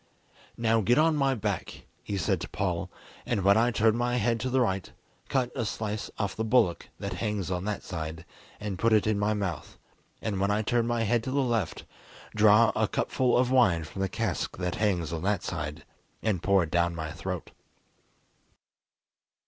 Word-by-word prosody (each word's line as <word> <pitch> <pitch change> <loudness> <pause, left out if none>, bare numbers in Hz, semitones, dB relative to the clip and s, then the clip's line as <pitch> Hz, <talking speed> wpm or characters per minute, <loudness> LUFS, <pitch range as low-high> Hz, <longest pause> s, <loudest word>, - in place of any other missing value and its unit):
"Now 115 -1 +2
get 120 +6 +3
on 160 +1 +4
my 135 -2 +2
back," 110 - -4 0.2
he 100 - -4
said 90 - 0
to - - -5
Paul, - - -2 0.3
"and 100 - -1
when 100 +1 +6
I 115 +2 +4
turn 110 -1 +3
my 120 +1 0
head 115 0 +1
to 130 +4 -2
the 130 +1 +2
right, 95 -6 0 0.4
cut 130 -3 +1
a 125 - -1
slice 105 -1 -3
off 100 -2 -2
the 110 - -2
bullock 110 -6 +2
that - - -4
hangs 105 -3 -2
on 90 +1 -2
that 105 -1 -3
side, 80 -2 -5 0.3
and 105 -3 -4
put 115 -1 +3
it 105 - +4
in 105 -1 +1
my 105 +1 +1
mouth, 100 -4 -4 0.4
and 105 -4 -2
when 100 +1 +1
I 105 +1 +1
turn 115 +1 +1
my 120 -1 0
head 115 +1 +1
to - - -2
the 140 0 +2
left, 115 -8 -1 0.5
draw 110 +1 +6
a - - +2
cupful 125 -2 +1
of 125 0 +2
wine 95 -11 +4
from 95 +5 -7
the 95 - 0
cask - - -2
that 90 -1 -2
hangs 90 -6 0
on 80 - -3
that 100 0 0
side, 75 -4 -4 0.4
and 105 -6 0
pour 100 -2 +3
it 80 - -6
down 85 0 +1
my 80 -1 -4
throat." 90 +3 -5
105 Hz, 195 wpm, -28 LUFS, 95-115 Hz, 0.5 s, when